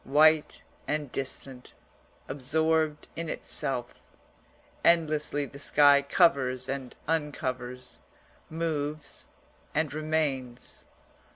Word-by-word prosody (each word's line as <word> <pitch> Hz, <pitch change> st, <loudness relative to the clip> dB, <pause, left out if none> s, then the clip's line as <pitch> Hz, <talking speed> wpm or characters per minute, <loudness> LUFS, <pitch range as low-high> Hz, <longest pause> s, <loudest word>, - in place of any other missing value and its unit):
White 155 Hz, +2 st, +4 dB, 0.2 s
and 150 Hz, -3 st, -2 dB
distant, 130 Hz, -1 st, -5 dB, 0.5 s
absorbed 155 Hz, +2 st, 0 dB
in 165 Hz, -1 st, -4 dB
itself, 125 Hz, -5 st, -2 dB, 0.8 s
endlessly 155 Hz, -3 st, +2 dB
the 140 Hz, 0 st, -11 dB
sky 145 Hz, 0 st, +5 dB
covers 135 Hz, -5 st, +2 dB
and 135 Hz, -2 st, -5 dB
uncovers, 130 Hz, -5 st, -3 dB, 0.5 s
moves 155 Hz, -2 st, -3 dB, 0.5 s
and 155 Hz, -2 st, 0 dB
remains. 150 Hz, -5 st, -2 dB
145 Hz, 80 wpm, -28 LUFS, 130-155 Hz, 0.8 s, sky